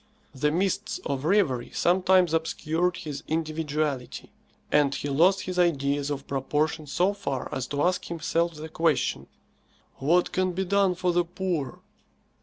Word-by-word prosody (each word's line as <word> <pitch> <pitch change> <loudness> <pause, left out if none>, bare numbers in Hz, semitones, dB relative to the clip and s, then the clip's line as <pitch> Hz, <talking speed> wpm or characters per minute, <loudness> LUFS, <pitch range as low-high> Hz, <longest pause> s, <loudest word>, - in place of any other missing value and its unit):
The 145 +2 +1
mists 185 +4 -1
of 140 0 -2
reverie 160 - +2
sometimes 185 -1 +3
obscured 165 +2 0
his 150 -5 -6
individuality, 155 -4 -2 0.4
and 140 -2 +3
he 145 - -3
lost 180 +7 +4
his 185 -1 -3
ideas 145 -4 +1
of 140 -1 -4
proportion 150 +3 -1
so 180 +7 +1
far 140 -11 -4
as 130 -1 -3
to 145 0 -1
ask 180 +1 +1
himself 170 0 -1
the 155 +1 -7
question, 160 -3 0 0.7
"What 170 +6 +2
can 185 0 0
be 190 +2 -1
done 195 -1 +2
for 180 0 0
the 175 0 +3
poor?" 175 -6 -3
160 Hz, 145 wpm, -26 LUFS, 145-180 Hz, 0.7 s, lost